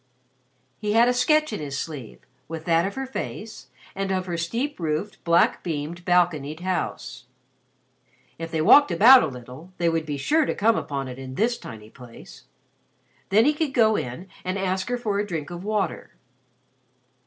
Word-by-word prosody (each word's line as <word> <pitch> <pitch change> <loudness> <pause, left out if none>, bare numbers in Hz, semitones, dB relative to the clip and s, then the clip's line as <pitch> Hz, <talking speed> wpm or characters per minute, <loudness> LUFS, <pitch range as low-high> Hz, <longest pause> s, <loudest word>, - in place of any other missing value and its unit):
He 210 -1 -1
had 230 +2 +5
a 250 - +3
sketch 305 +2 +2
in - - -3
his 140 -2 -5
sleeve, 140 -9 -7 0.3
with 160 0 -7
that 170 +1 +2
of 200 - -6
her 270 0 -3
face, 225 -4 -7 0.3
of 190 -1 -1
her 175 -2 -3
steep 230 - -3
roofed, 160 +5 -3
black 170 0 +3
beamed, 165 +1 -4
balconied 170 -4 +1
house. 185 0 -4 1.1
If 165 0 -5
they 160 -1 -1
walked 285 - +7
about 250 +4 +8
a - - 0
little, 125 +6 -10
they 170 -1 +2
would 165 -1 -1
be 145 -1 -3
sure 305 - +2
to - - -2
come 225 +2 +3
upon 140 -7 -3
it 130 0 -8
in 130 -1 -8
this 235 - +1
tiny 110 -1 -11
place. 120 -2 -14 0.8
Then 215 +4 +4
he 300 - +4
could 300 -3 -2
go 220 -3 +4
in 125 +7 -5 0.2
and 185 +1 -2
ask 190 +2 -2
her 245 - 0
for 210 -4 -2
a 205 - -2
drink 165 -3 -5
of 175 +1 -7
water. 205 -4 -2
180 Hz, 175 wpm, -24 LUFS, 155-220 Hz, 1.1 s, about